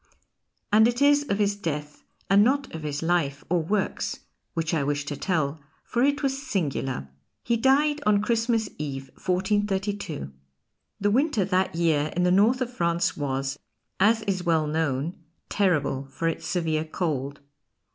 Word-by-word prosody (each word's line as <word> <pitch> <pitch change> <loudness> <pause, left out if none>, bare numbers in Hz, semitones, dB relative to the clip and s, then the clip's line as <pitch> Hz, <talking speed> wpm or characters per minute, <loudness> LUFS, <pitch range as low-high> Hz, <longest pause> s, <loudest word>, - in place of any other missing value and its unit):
And 220 +1 +7
it 240 +1 -1
is 290 0 +4
of 200 - +1
his 205 -1 +1
death 150 -6 -4 0.3
and 200 +1 +6
not 275 +4 +1
of 160 - -5
his 150 0 -3
life 160 -5 0
or 175 -2 +3
works 195 +5 -2 0.3
which 165 -1 -1
I 160 - +2
wish 145 0 -1
to 145 - -4
tell, 155 -4 -1 0.2
for 240 - -1
it 285 +2 +2
was 270 0 0
singular. 140 - -2 0.4
He 235 - +1
died 290 +5 +3
on 205 -1 +4
Christmas 230 -1 +1
Eve, 135 -3 -5
1432. 195 - -1 0.7
The 205 +1 +2
winter 255 - +2
that 185 -2 0
year 155 -3 +1
in 180 - +1
the 180 - +3
north 220 +7 +4
of 250 0 -2
France 170 -2 0
was, 135 -1 -2 0.4
as 220 +3 +4
is 190 -2 -1
well 165 -3 +2
known, 150 0 -1 0.3
terrible 150 -9 +1
for 135 +5 -3
its 165 - -2
severe 160 -3 0
cold. 145 -4 -3
180 Hz, 155 wpm, -26 LUFS, 150-215 Hz, 0.7 s, And